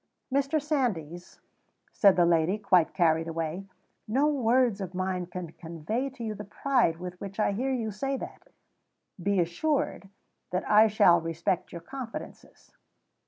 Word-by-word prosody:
"Mr. 280 +3 +2
Sandys," 215 - -2 0.5
said 200 -3 +5
the 175 - +4
lady, 170 +3 +2
quite 185 -5 +3
carried 165 -2 +2
away, 165 +3 -3 0.4
"no 260 +7 +2
words 250 -6 +2
of 185 -1 -6
mine 185 -1 -2
can 180 -2 -7
convey 170 - -4
to 260 -3 -9
you 220 -1 -2
the - - -7
pride 240 -5 +1
with 180 +1 -8
which 195 +1 -7
I 210 - +2
hear 255 +7 -1
you 230 -4 -2
say 270 +7 -2
that. - - -9 0.7
Be 200 +1 +1
assured 195 - -1 0.4
that 185 0 -2
I 215 +1 +6
shall 185 -5 +5
respect 165 +2 -2
your 170 - -7
confidences." 255 +4 -9
195 Hz, 150 wpm, -28 LUFS, 170-250 Hz, 0.7 s, I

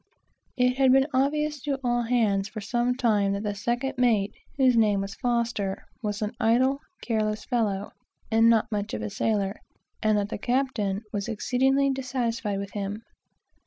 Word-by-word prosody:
It 250 0 +2
had 265 -1 +5
been 270 0 +5
obvious 295 +2 +1
to 280 -1 -2
all 240 -1 +1
hands 220 -5 +1
for 215 - -6
some 240 +4 0
time 210 -6 +2
that 200 +1 -3
the 205 -1 -1
second 240 +6 -2
mate, 220 -5 +2 0.2
whose 260 -3 +4
name 210 -3 +3
was 195 +1 -5
F, 235 -1 +1 0.4
was 210 -1 -2
an 210 - -2
idle, 250 +4 +3 0.2
careless 215 -2 -1
fellow, 205 -5 -1 0.4
and 225 +1 +5
not 225 -1 +3
much 205 - -2
of 105 - -4
a 105 - -4
sailor, 205 -2 -1 0.4
and 215 -1 +3
that 205 0 -1
the 210 - -4
captain 235 -5 0
was 200 -1 -2
exceedingly 265 +5 +2
dissatisfied 245 -5 -2
with 200 0 -5
him. 205 +2 -4
230 Hz, 165 wpm, -26 LUFS, 205-255 Hz, 0.4 s, had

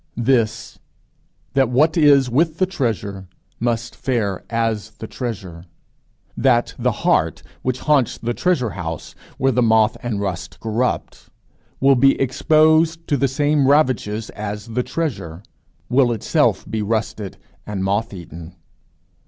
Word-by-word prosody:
This: 115 -2 0 0.7
that 135 -3 +3
what 150 +6 +3
is 145 -5 +5
with 155 +6 +1
the 185 - +3
treasure 110 - -3 0.3
must 115 0 -2
fare 110 -7 -2
as 115 -2 -1
the - - -7
treasure; 95 -9 -6 0.7
that 120 -3 +2
the - - +2
heart 80 0 +2 0.2
which 130 0 -2
haunts 145 -6 +2
the 120 +1 -3
treasure 135 - 0
house 80 -4 -6 0.2
where 135 0 +2
the 125 - +1
moth 110 -2 +3
and 115 -4 -3
rust 95 -5 -4
corrupt, 115 +3 -2 0.5
will 135 +1 +5
be 135 +1 +4
exposed 155 +4 +3
to 145 - +3
the 140 0 +2
same 145 +1 +1
ravages 125 -7 +1
as 105 +1 -6
the 120 +2 -1
treasure, 115 - -4 0.4
will 125 -1 +3
itself 115 - +1
be 110 0 -2
rusted 105 -2 -3 0.3
and 100 -2 -3
moth 100 +4 0
eaten. 85 -2 -10
120 Hz, 135 wpm, -20 LUFS, 105-135 Hz, 0.7 s, is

